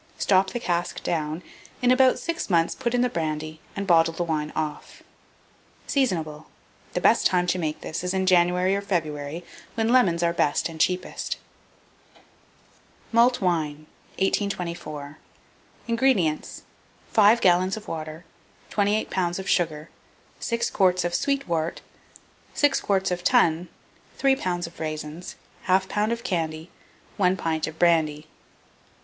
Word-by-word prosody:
Stop 190 -1 +3
the 240 - -4
cask 175 -6 -2
down; 155 +1 -2 0.4
in 250 0 +3
about 260 0 +5
six 335 -6 -4
months 165 -2 +3
put 245 -2 -2
in 245 - +2
the 250 - +3
brandy 155 -3 -3 0.2
and 200 -1 -3
bottle 165 -2 +4
the 175 - -1
wine 155 -2 -2
off. 155 -1 -5 0.8
Seasonable. 160 - -1 0.5
The - - 0
best - - +5
time 180 -1 +1
to 180 +1 0
make 155 -2 -3
this 160 - -4
is 180 - -1
in 190 0 0
January 180 +1 +3
or 200 - -1
February, 160 -4 -3 0.3
when 225 0 0
lemons 175 -10 +4
are 170 0 +2
best 150 0 +1
and 160 -1 -5
cheapest. 180 +1 -1 1.7
MALT 235 +1 +4
WINE. 155 -5 -1 0.3
1824. 170 -7 -2 0.7
INGREDIENTS. 230 -10 +1 0.5
5 220 +1 +6
gallons 185 +1 +3
of 215 - -10
water, 155 +1 -6 0.5
28 210 +1 +1
lbs. 175 -2 0
of 190 0 -6
sugar, 155 -3 0 0.5
6 235 0 -1
quarts 185 -2 +2
of 175 - -2
sweet 280 +5 0
wort, 165 -1 -2 0.7
6 290 -1 +3
quarts 190 -2 +1
of 175 0 -2
tun, 175 -7 +3 0.5
3 270 -1 +3
lbs. 175 -8 -2
of 165 - -12
raisins, 155 +2 -5 0.3
1/2 190 0 +3
lb. 210 +2 0
of 235 0 -3
candy, 165 -6 -3 0.5
1 185 -1 +3
pint 160 -2 -1
of 155 0 -8
brandy. 155 -3 +2
175 Hz, 140 wpm, -25 LUFS, 160-200 Hz, 1.7 s, 5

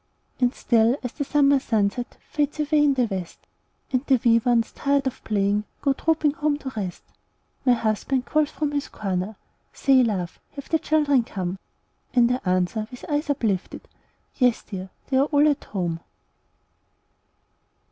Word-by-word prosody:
And 250 0 +2
still, 235 +1 +3
as 250 - -3
the 285 - -3
summer 280 -1 +3
sunset 225 0 -1
Fades 295 0 -1
away 300 0 +3
in 285 -2 +3
the 255 - +2
west, 190 -5 -6 0.5
And 255 0 +2
the 265 -3 +4
wee 230 -1 +6
ones, 230 -1 +1
tired 280 -1 0
of 265 - -4
playing, 205 0 +1 0.2
Go 275 - +3
trooping 315 0 +1
home 295 0 0
to 275 -2 -6
rest, 190 -5 -4 0.6
My 250 - +7
husband 235 +3 0
calls 305 -1 +1
from 300 -2 -2
his 285 -1 -2
corner, 195 +1 -3 0.4
"Say, 270 -2 +4
love, 190 -7 -2
have 280 - -9
the 320 - +2
children 295 -4 +3
come?" 190 -3 -4 0.6
And 240 -1 +5
I 250 - -1
answer, 185 +4 0
with 250 - -10
eyes 295 +1 -1
uplifted, 215 -9 -2 0.5
"Yes, 250 -4 +2
dear! 190 -2 -7 0.2
they 265 - +3
are 275 - +4
all 295 0 +3
at 290 -1 0
home." 175 -4 -3
250 Hz, 160 wpm, -24 LUFS, 210-285 Hz, 0.6 s, My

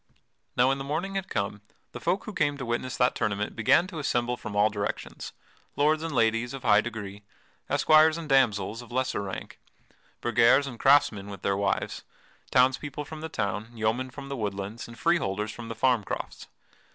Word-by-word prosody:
Now 125 +2 +5
when 135 0 0
the - - -4
morning 160 +8 -2
had 195 -1 -3
come, 100 -1 -2 0.3
the - - -7
folk 190 +1 0
who 215 - -6
came 145 -5 +1
to 130 - -5
witness 120 +2 -2
that 125 - +3
tournament 105 0 -2
began 115 +9 +4
to 180 -4 -7
assemble 125 -4 0
from 110 -3 -7
all 105 +1 +4
directions 105 -1 -4 0.4
lords 155 +2 +3
and 165 0 -3
ladies 115 0 +1
of 135 - -9
high 105 -3 +5
degree, 105 -3 -6 0.5
esquires 155 +1 +5
and 165 -2 -6
damsels 115 -5 +2
of 120 - -13
lesser 130 -3 -1
rank, 95 -2 -7 0.6
burghers 120 +4 +4
and 125 -4 -7
craftsmen 115 -8 +4
with 100 -2 -9
their 100 - +1
wives, 100 0 -1 0.5
townspeople 130 +3 +2
from 155 +1 -8
the 160 - -5
town, 105 -3 -3
yeomen 110 +4 0
from 140 +1 -9
the 140 - -4
woodlands, 100 -1 -4
and 120 0 -12
freeholders 105 - 0
from 115 +2 -9
the 115 - -5
farm 120 -1 +2
crofts. - - -6
120 Hz, 185 wpm, -27 LUFS, 105-140 Hz, 0.6 s, Now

